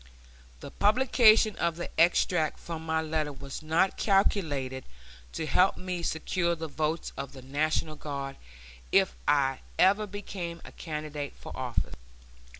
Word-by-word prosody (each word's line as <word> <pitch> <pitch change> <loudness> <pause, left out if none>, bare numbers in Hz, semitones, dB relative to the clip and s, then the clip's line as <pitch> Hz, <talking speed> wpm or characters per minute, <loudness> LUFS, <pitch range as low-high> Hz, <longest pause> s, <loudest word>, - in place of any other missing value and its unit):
The - - -8
publication 220 -1 +5
of 170 -1 0
the 175 - -6
extract 165 -1 +3
from 165 -1 -6
my 160 0 0
letter 155 -1 -1
was 140 0 -8
not 160 +4 +1
calculated 145 - +1 0.5
to 160 - -3
help 180 +6 +3
me 180 -1 -4
secure 170 +1 0
the 160 0 -5
votes 155 +2 -2
of 140 0 -6
the 130 -2 -11
National 155 +3 -1
Guard 140 -2 -5 0.5
if 195 -1 +3
I 135 -2 +3 0.2
ever 200 +3 +4
became 185 -4 -6
a - - -10
candidate 150 -3 -5
for - - -9
office. - - -2
160 Hz, 140 wpm, -29 LUFS, 145-185 Hz, 0.5 s, publication